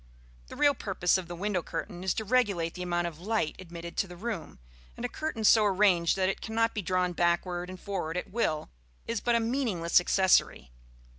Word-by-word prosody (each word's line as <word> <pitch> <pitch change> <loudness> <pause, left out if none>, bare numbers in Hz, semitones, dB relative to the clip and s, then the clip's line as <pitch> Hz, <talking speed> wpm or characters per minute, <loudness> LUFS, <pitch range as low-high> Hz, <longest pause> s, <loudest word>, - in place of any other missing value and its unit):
The - - -10
real 290 -1 +4
purpose 190 -6 +1
of 180 - -8
the 175 - -6
window 190 0 -1
curtain 175 +3 -6
is 190 - 0
to 220 - -3
regulate 200 -8 +1
the 180 - -7
amount 175 -1 -1
of 165 -2 -5
light 205 -4 -1
admitted 170 -1 -8
to 195 - +1
the 175 - -10
room, 210 -3 -5 0.4
and 240 - -4
a - - +1
curtain 310 -4 -4
so 215 0 +6
arranged 190 -4 +3
that 190 -1 +1
it 195 - -2
cannot 225 +1 0
be 210 - -2
drawn 180 0 0
backward 175 +1 0
and 185 0 -8
forward 180 -4 -3
at 180 - -5
will 160 - -1 0.3
is 230 -2 -2
but 240 -1 +2
a - - +4
meaningless 225 -9 +2
accessory. 175 - +2
185 Hz, 205 wpm, -29 LUFS, 175-220 Hz, 0.4 s, so